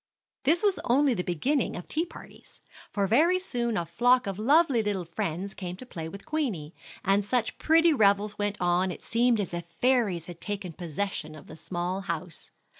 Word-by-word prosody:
This 330 +7 +4
was 400 -3 +2
only 265 +2 +3
the 180 - -1
beginning 235 - 0
of 175 - -7
tea 325 +3 -1
parties; - - -14 0.3
for 200 -2 0
very 310 - +4
soon 240 - -2
a 170 - -1
flock 245 +9 +3
of 195 0 -4
lovely 275 +1 +4
little 205 -4 -2
friends 170 +3 -3
came 180 -2 -6
to 225 - -11
play 165 -9 -6
with 200 +3 -10
Queenie, 240 - -2 0.3
and 195 +1 +3
such 225 +2 -1
pretty 325 +1 +5
revels 205 -3 +3
went 205 0 -2
on 180 +1 +2
it 180 - -7
seemed 235 0 +2
as 195 -3 -3
if 175 0 -3
fairies 210 -4 +1
had 175 -1 -10
taken 200 -4 -4
possession 165 -1 -4
of 150 - -12
the 155 - -11
small 175 +3 -3
house. 170 -2 -5
205 Hz, 190 wpm, -28 LUFS, 175-250 Hz, 0.3 s, pretty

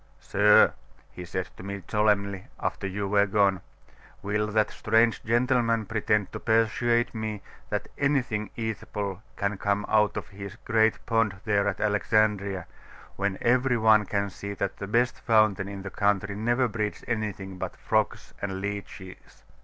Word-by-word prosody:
"Sir," 105 +1 +5 0.4
he 90 - -8
said 90 +1 -3
to - - -9
me 100 -1 -6
solemnly, 100 -3 +1
after 100 - -2
you 100 +1 -3
were 100 +1 +3
gone, 100 -2 +2 0.6
"will 105 +1 0
that 105 0 +1
strange 115 +1 +2
gentleman 115 -1 +2
pretend 105 -2 0
to - - -6
persuade 120 +2 +2
me 110 -3 -4 0.3
that - - -2
anything 130 -7 0
eatable 105 -3 -4
can 100 0 -2
come 100 0 0
out 105 -1 +2
of - - -5
his 100 0 -8
great 110 -2 +2
pond 115 -4 +1
there 100 -2 +2
at 100 -2 -2
Alexandria, 105 -3 +1 0.5
when 100 -1 -1
every 125 +1 +3
one 110 -2 +4
can 100 -1 -1
see 100 +1 -6
that 100 0 -3
the 100 - -5
best 120 +4 +1
fountain 110 -3 +3
in 100 -1 -7
the 95 - -6
country 100 0 0
never 120 +4 +1
breeds 105 -2 -3
anything 100 -5 -3
but - - -4
frogs - - -1
and 95 -1 -3
leeches?" 100 -2 -7
105 Hz, 155 wpm, -27 LUFS, 100-110 Hz, 0.6 s, Sir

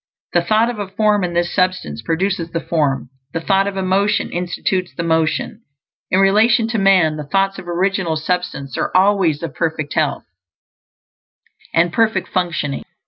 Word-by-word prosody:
_ 175 - +5
_The 170 - -11
thought 220 +4 +3
of 225 - -8
a 205 - -3
form, 210 0 +1
in 175 -1 -2
this 175 0 0
Substance, 185 - -1
produces 170 0 -1
the 165 - -2
form; 145 -6 -1 0.2
the 165 - -1
thought 195 +3 +2
of 200 -1 -4
a 190 - -1
motion 200 +3 +1
institutes 180 +1 -2
the 170 - -3
motion. 160 +6 0 0.5
In 185 - +2
relation 220 +4 +4
to 225 -1 -1
man, 185 -6 +4
the 150 -2 -6
thoughts 195 +4 0
of 175 - -11
Original 180 -1 0
Substance 155 -5 -3
are - - 0
always 185 -6 +2
of 160 -4 -4
perfect 160 -3 -2
health 150 -3 0 1.5
and 170 +1 +2
perfect 220 -4 +1
functioning. 170 -6 -2
180 Hz, 170 wpm, -19 LUFS, 165-195 Hz, 1.5 s, _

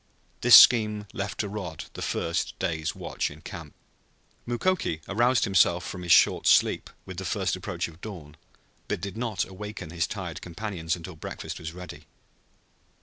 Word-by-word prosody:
This 120 0 +9
scheme 105 -3 +7
left 100 -1 -3
to 105 - -3
Rod 95 -6 -6
the - - -8
first 85 +1 -2
day's 80 -1 -2
watch - - -3
in - - -13
camp. - - -9 0.7
Mukoki 120 - 0
aroused 120 +4 +2
himself 90 -2 +3
from 90 - -6
his 85 -1 -2
short - - +5
sleep - - +4 0.2
with 95 -2 -8
the 95 - -4
first 80 - -1
approach - - -4
of 85 +1 -15
dawn 85 -9 -9 0.5
but - - -2
did 100 -2 -6
not 115 -5 -1
awaken 95 -3 -8
his 85 -1 -1
tired 90 -5 -6
companions 90 -2 -3
until 90 0 -9
breakfast 80 - -7
was 80 0 -6
ready. 80 -4 -10
95 Hz, 160 wpm, -27 LUFS, 85-105 Hz, 0.7 s, This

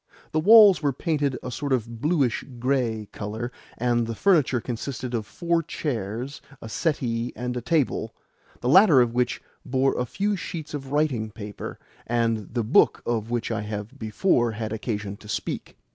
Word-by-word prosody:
The 155 - +1
walls 205 -1 +8
were 145 -2 +1
painted 145 -2 -1
a 125 - -5
sort 140 +3 -4
of 115 -2 -1
blueish 145 -6 +1
grey 120 -4 0
colour, 110 +4 -5 0.3
and 120 -1 +1
the 115 - -3
furniture 155 - +3
consisted 125 +2 -5
of 110 -3 -2
four 170 +6 0
chairs, 125 -3 -4 0.2
a - - -8
settee, 120 -4 -1
and 125 0 -3
a 125 - -2
table 135 -6 0 0.5
the 120 - -2
latter 170 0 +7
of 120 -2 +3
which 125 0 0 0.2
bore 135 +1 +1
a 125 - -1
few 205 - 0
sheets 165 -4 -6
of 135 -2 -6
writing 140 -7 +1
paper 105 -1 -7 0.3
and 115 -2 0
the 120 - +1
book 110 - +4
of 115 -2 -1
which 120 -1 -2
I 115 -1 -1
have 105 0 -6
before 115 - +1
had 110 0 -4
occasion 105 -3 -4
to 105 - -14
speak. - - -4
125 Hz, 170 wpm, -25 LUFS, 115-145 Hz, 0.5 s, walls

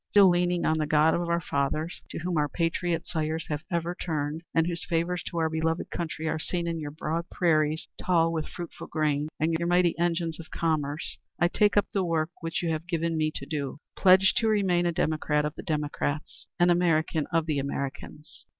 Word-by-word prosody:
Still 200 -2 +7
leaning 175 0 +1
on 160 0 +2
the 155 - 0
God 155 +1 +4
of 170 0 -1
our 170 0 +2
fathers, 155 +2 -2
to - - -6
whom 175 +1 -2
our 150 -1 +1
patriot 170 +1 -1
sires 160 -1 -2
have 150 -1 -2
ever 170 0 -1
turned, 155 -3 -3
and 165 -1 +3
whose 170 0 -2
favors 170 0 0
to 170 - -5
our 160 -1 +2
beloved 160 +1 -1
country 160 -1 -3
are 155 - -1
seen 170 +2 -2
in 165 -1 -2
your 150 -2 -4
broad 160 +3 -3
prairies 155 -3 +1 0.2
tall 165 -2 +3
with 160 -2 -2
fruitful 175 -2 -8
grain, 150 -1 0
and 160 +2 +1
your 170 - -1
mighty 175 -1 +3
engines 170 -1 0
of 165 - -9
commerce, 155 -2 -2 0.2
I 175 - +4
take 205 +2 +3
up 205 - +5
the 195 - +1
work 165 -1 0
which 165 +1 -3
you 165 - +1
have 160 +2 -3
given 165 -2 -1
me 155 -1 +1
to - - -4
do, 145 -4 -3 0.2
pledged 190 0 +5
to 230 - +2
remain 190 -5 +2
a - - +2
democrat 155 -2 0
of 150 - -2
the - - -8
democrats, 150 -2 -3
an 175 0 +5
American 165 -3 +2
of 165 -1 +2
the 150 -3 0
Americans." 140 +2 -6
165 Hz, 205 wpm, -27 LUFS, 155-175 Hz, 0.2 s, Still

